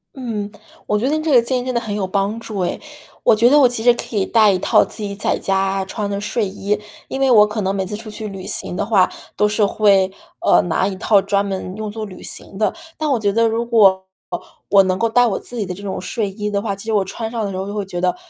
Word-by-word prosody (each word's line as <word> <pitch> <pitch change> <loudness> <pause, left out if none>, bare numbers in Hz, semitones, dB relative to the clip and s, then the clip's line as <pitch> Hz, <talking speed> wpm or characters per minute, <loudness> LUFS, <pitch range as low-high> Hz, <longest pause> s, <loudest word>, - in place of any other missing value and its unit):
嗯， 220 -6 -4 0.4
我 210 - +1
觉 245 +5 0
得 305 - +1
你 310 - -2
这 315 - 0
个 245 -3 +7
建 250 +2 0
议 245 - -5
真 255 - -2
的 - - +3
很 215 -3 -4
有 195 -2 -1
帮 200 +3 -1
助 215 -3 -6
哎。 180 - -1 0.4
我 - - +5
觉 235 +3 +5
得 295 +1 +6
我 260 - +7
其 240 -2 -2
实 245 -1 +6
可 235 - -7
以 195 - +2
带 220 -3 +4
一 185 - +1
套 - - +4
自 215 - -8
己 200 -1 -3
在 200 - -1
家 195 0 0
穿 205 +1 -4
的 200 0 -2
睡 210 0 -1
衣， 200 +2 -2 0.3
因 265 - -4
为 270 -1 +3
我 210 -3 +7
可 210 +1 -4
能 195 +1 -1
每 190 -1 -1
次 210 - -5
出 220 -1 -9
去 215 0 -6
旅 190 -1 -8
行 180 - -2
的 - - -1
话 200 -4 +3 0.3
都 210 - +3
是 210 0 +2
会， 200 -2 +3 0.3
呃， - - +4
拿 175 +2 0
一 195 - -3
套 200 +1 +3
专 200 +1 0
门 190 -1 -4
用 215 -1 -5
做 220 0 -5
旅 185 -3 -11
行 190 - -6
的。 210 -2 +1 0.2
但 310 -1 -1
我 245 - +2
觉 200 -2 0
得 230 0 +3
如 230 +1 -1
果 195 -5 +4 0.6
我 200 -1 +7
能 185 0 0
够 230 +2 +1
带 245 +1 +4
我 195 - -1
自 245 - -8
己 210 - -1
的 180 - -5
这 200 +3 -11
种 195 -2 -4
睡 205 +2 -2
衣 210 +1 -4
的 200 -1 -1
话， 205 -2 -2
其 200 - -10
实 220 - -2
我 205 - +3
穿 220 +4 -5
上 230 -2 -3
的 200 - -3
时 185 - -5
候 190 - -4
就 205 - -5
会 205 -2 -2
觉 175 -2 -5
得， 180 0 +1
210 Hz, 310 characters per minute, -19 LUFS, 195-225 Hz, 0.6 s, 个